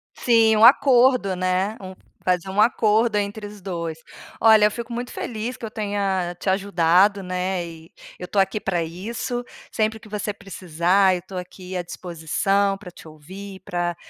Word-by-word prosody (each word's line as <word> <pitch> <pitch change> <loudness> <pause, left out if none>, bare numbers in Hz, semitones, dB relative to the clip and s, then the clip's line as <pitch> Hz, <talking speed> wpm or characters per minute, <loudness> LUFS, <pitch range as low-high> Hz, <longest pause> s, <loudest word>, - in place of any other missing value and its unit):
Sim, 225 -2 +4
um 220 - +7
acordo, 250 -6 +5
né, 185 +4 -1
um 185 0 -9 0.3
fazer 180 0 0
um 200 +2 +2
acordo 220 -1 +3
entre 205 +1 -3
os 205 -1 -12
2. 170 -4 -4 0.4
Olha 220 -2 +6
eu 210 - +3
fico 235 +1 -6
muito 245 +1 -5
feliz 235 +2 -5
que - - -7
eu 215 - -7
tenha 195 -4 -2
te 190 - -2
ajudado, 190 +1 +3
né, 180 0 -2
e 165 -1 -12 0.3
eu 180 - -6
tô 200 - -6
aqui 195 +2 +2
pra 175 -4 -1
isso. 225 +8 -4 0.3
Sempre 220 0 -1
que 215 - -15
você 210 0 -3
precisar 185 -1 +1
eu 180 - -5
tô 190 - -11
aqui 180 +1 -8
à 180 - -1
disposição 185 +4 -1
pra 195 -3 -11
te 165 - -14
ouvir, 190 +6 -11
pra, 175 -3 -2
195 Hz, 175 wpm, -22 LUFS, 180-215 Hz, 0.4 s, um